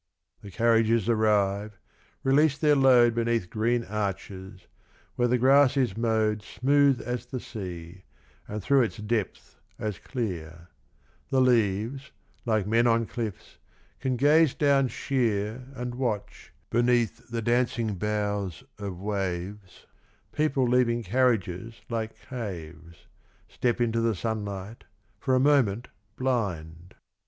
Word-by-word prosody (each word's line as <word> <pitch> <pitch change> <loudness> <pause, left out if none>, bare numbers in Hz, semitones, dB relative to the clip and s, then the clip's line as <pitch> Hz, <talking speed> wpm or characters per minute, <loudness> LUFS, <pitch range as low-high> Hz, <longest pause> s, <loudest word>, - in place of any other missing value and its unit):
The 100 - -10
carriages 115 +2 +2
arrive, 105 -2 +1 0.5
release 145 +2 +3
their 150 -1 +3
load 125 -4 +5
Beneath 115 -5 -1
green 115 +2 +1
arches, 95 -2 -5 0.5
where 120 - +2
the 125 +1 +2
grass 135 +2 +5
is 125 -8 +1
mowed 110 -2 +1
Smooth 140 +2 +2
as 125 0 -4
the 130 +1 -4
sea, 90 -5 -8 0.4
and 105 -1 -5
through 140 +3 +4
its 115 -1 -1
depth 105 -1 -3 0.2
as 105 -3 -4
clear; 85 - -5 0.6
The 135 - +2
leaves, 120 +2 +1 0.4
like 110 -4 +1
men 115 +3 +3
on 115 0 +3
cliffs, 110 -5 -6 0.4
can 130 -1 -1
gaze 150 +2 +4
down 140 -2 +3
sheer 115 -1 -1
And 125 -1 -4
watch, 120 -5 -4 0.2
beneath 120 -1 +1
the 115 -1 -3
dancing 120 -2 +1
boughs 105 -2 -2 0.2
of 100 -3 -5
waves, 95 -1 -4 0.5
People 140 -4 +1
leaving 120 -1 +2
carriages 115 -2 0
like 110 -1 -4
caves. 85 - -8 0.4
Step 120 0 -1
into 115 -1 +1
the 115 -2 +1
sunlight, 105 0 -5 0.4
for 130 +1 +1
a - - +4
moment 125 -6 +2 0.3
blind. 90 -10 -3
115 Hz, 120 wpm, -27 LUFS, 100-125 Hz, 0.6 s, load